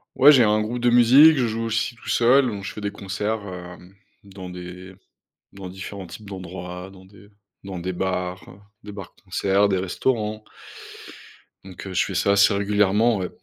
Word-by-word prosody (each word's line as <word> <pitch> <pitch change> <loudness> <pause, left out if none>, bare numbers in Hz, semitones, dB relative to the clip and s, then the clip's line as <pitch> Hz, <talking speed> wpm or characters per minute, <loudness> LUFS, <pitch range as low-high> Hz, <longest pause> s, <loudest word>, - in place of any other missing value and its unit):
Ouais, 140 +3 +8
j'ai 130 -5 +6
un 105 0 +2
groupe 110 +3 -3
de 120 0 +2
musique, 135 +6 +7
je 125 - +1
joue 115 +1 -3
aussi 115 +1 -2
tout - - -16
seul, 130 +3 +4
donc 100 -4 -5
je - - -5
fais 105 - -9
des 105 - -3
concerts, 105 +3 -4
hem, 90 +1 -10 0.3
dans 95 -2 -10
des 90 +1 -10 0.6
dans 95 -2 -9
différents 95 +1 -8
types 100 +5 -11
d'endroits, 90 -1 -8
dans 95 -1 -16
des 100 +1 -18 0.3
dans 95 -2 -7
des 90 +1 -4
bars, 90 0 -3 0.4
des 105 - -9
bars-concerts, 100 0 -1
des 95 - +1
restaurants. 105 +2 -2 1.2
Donc, 95 -1 -11
heu, 95 - -7
je 90 - +1
fais 95 - -6
ça 100 +2 +2
assez 100 +1 +4
régulièrement, 105 +2 +2
ouais. 90 -1 -4
100 Hz, 180 wpm, -23 LUFS, 95-110 Hz, 1.2 s, Ouais